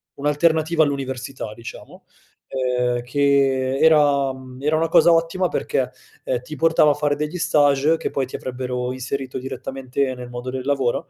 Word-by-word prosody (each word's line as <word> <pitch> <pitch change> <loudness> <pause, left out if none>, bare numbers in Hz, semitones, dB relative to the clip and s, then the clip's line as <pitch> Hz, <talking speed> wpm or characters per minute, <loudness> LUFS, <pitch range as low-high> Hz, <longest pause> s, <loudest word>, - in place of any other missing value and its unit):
un'alternativa 160 +2 +2
all'università, 130 -5 -4
diciamo, 115 +1 -11 0.4
ehm, 125 -1 -1
che 135 0 +1
era 145 -4 +4
mhmm, 130 0 -12
era 150 +2 +1
una 165 +1 +1
cosa 170 +1 +5
ottima 165 +2 +2
perché, 130 -1 -1 0.3
ehm, 125 -2 -2
ti 150 +5 -9
portava 160 -1 +4
a - - +2
fare 145 0 0
degli 150 +4 -3
stages 145 +1 +3
che - - -4
poi 135 -2 -1
ti - - -8
avrebbero 125 -1 -4
inserito 130 +1 -4
direttamente 130 +1 -3
nel 125 -1 -9
modo 120 +1 -6
del 130 0 -4
lavoro. 135 -4 0
135 Hz, 155 wpm, -22 LUFS, 125-150 Hz, 0.4 s, cosa